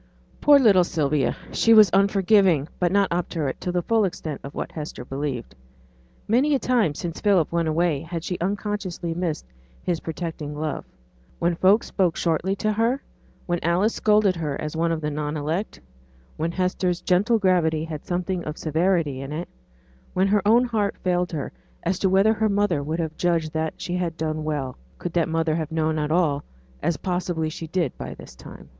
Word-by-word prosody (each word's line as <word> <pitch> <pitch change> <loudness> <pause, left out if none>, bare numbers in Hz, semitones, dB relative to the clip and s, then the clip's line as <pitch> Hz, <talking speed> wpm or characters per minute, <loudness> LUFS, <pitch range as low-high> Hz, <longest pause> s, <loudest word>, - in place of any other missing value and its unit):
Poor 290 -1 +7
little 205 -9 +6
Sylvia! 150 -5 0
She 230 0 +4
was 210 -5 +8
unforgiving, 195 -5 +4
but 175 -1 +2
not 200 -1 +2
obdurate 165 -5 -2
to 180 - -2
the 175 -1 -1
full 225 +2 +2
extent 160 -6 -3
of 140 - -8
what - - -4
Hester 150 -5 -7
believed. 135 - -4 0.7
Many 270 +7 +3
a - - +4
time 235 -14 +1
since 170 +1 -5
Philip 195 -7 +3
went 170 -1 0
away 160 -2 +1
had 165 0 -5
she 180 0 -3
unconsciously 195 -3 -2
missed 165 - -3 0.4
his 170 -2 -1
protecting 160 -3 -5
love; 155 0 -3 0.5
when 170 +1 +1
folks 190 +6 +4
spoke 180 -5 +1
shortly 175 +3 0
to 215 +2 0
her, 230 +5 +1 0.5
when 175 -1 -1
Alice 180 +6 +2
scolded 210 -3 +3
her 150 -4 -3
as 150 +1 -4
one 165 +1 +1
of 165 -1 -2
the 150 0 -2
non 150 +1 -3
elect, 160 +8 -3 0.6
when 165 +2 -2
Hester's 180 0 -1
gentle 205 +6 +3
gravity 175 -6 +2
had 155 -2 -6
something 180 0 -2
of 150 0 -5
severity 160 -3 0
in 135 +1 -6
it; 165 +4 -4 0.7
when 190 +1 +3
her 205 0 +3
own 235 +3 +5
heart 215 -4 -1
failed 180 -1 +1
her 150 -4 -4 0.3
as 175 +1 0
to 190 - +2
whether 195 +4 +4
her 220 0 +1
mother 200 -6 +1
would 155 +3 -3
have 160 -2 -3
judged 165 -3 0
that 160 0 -2
she 180 0 -3
had 170 -2 -2
done 155 -1 -2
well, 140 -4 -3 0.2
could 175 - -5
that 170 -2 +1
mother 165 -1 +1
have 160 -1 -2
known 160 -1 0
all, 155 -4 +1 0.4
as 170 - 0
possibly 175 -2 -2
she 165 0 -7
did 170 -5 -1
by - - -6
this - - -12
time. - - -12
170 Hz, 185 wpm, -24 LUFS, 155-195 Hz, 0.7 s, was